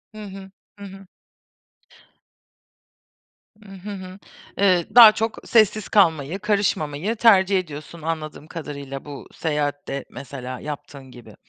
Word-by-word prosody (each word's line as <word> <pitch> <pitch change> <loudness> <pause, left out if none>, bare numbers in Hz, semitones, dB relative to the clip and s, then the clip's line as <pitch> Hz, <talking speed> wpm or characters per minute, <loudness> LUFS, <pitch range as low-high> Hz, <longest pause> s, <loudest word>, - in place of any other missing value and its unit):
Hı 215 - -8
hı. 195 0 -12 2.5
Hı 210 - -15
hı, 190 0 -9 0.4
eee, 185 -4 +3
daha 230 -3 +11
çok 220 +1 -3
sessiz 215 -2 +2
kalmayı, 165 -3 +2
karışmamayı 200 -3 -1
tercih 200 -4 +4
ediyorsun, 155 0 -9
anladığım 155 -1 -5
kadarıyla 140 -4 -7
bu 145 -2 -9
seyahatte, 145 -3 -3
mesela, 130 -1 -8
yaptığın 140 -3 -8
gibi. 120 -2 -14
175 Hz, 100 wpm, -22 LUFS, 145-200 Hz, 2.5 s, daha